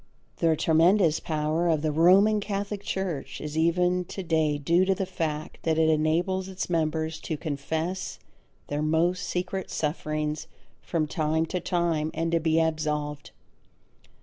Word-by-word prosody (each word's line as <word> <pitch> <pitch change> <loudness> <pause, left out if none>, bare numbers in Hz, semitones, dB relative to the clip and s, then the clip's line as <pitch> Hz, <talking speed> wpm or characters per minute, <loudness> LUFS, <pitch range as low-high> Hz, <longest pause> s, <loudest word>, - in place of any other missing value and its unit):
The 165 -2 +3
tremendous 165 +2 +4
power 155 +2 -1
of 155 -2 +1
the 155 - +1
Roman 190 +7 +5
Catholic 200 0 -3
Church 190 -7 -3
is 150 0 -6
even 180 +3 +2
to 190 - -6
day 160 -3 +1
due 170 +5 +3
to 190 0 +2
the 190 - -2
fact 160 -4 -4
that 160 -1 0
it 160 0 +4
enables 170 +5 +1
its 185 -1 -5
members 160 -1 0
to 160 - -4
confess 160 +5 -3 0.5
their 145 +1 -3
most 170 +4 +1
secret 185 +1 -3
sufferings 155 0 -2 0.3
from 165 -3 -1
time 155 +1 0
to 180 +3 -3
time 170 -3 0
and 165 0 -1
to 170 - +3
be 160 0 +2
absolved. 150 -2 -1
160 Hz, 150 wpm, -27 LUFS, 155-180 Hz, 0.5 s, Roman